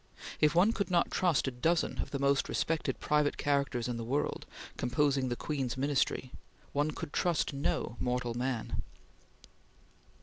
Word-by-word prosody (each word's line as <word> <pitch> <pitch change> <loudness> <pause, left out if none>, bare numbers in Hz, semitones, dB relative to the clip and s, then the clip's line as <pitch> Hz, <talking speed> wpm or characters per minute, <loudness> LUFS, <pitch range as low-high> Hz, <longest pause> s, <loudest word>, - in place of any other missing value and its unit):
If 150 +1 +4
one 195 +6 +5
could 200 - -1
not 175 -2 +2
trust 175 -7 +2
a - - 0
dozen 160 +7 0
of - - -2
the 140 - -2
most 140 0 +2
respected 165 -1 -1
private 150 -1 +1
characters 140 -4 0
in 120 -1 -2
the 115 - -4
world, 135 +6 -1 0.3
composing 135 +1 +1
the 120 - -1
Queen's 130 -3 -2
Ministry, 135 -2 0 0.4
one 145 +2 +1
could 145 - -6
trust 170 -4 +1
no 140 -3 -1
mortal 125 -1 -1
man. 120 -1 -2
140 Hz, 155 wpm, -32 LUFS, 125-150 Hz, 0.4 s, one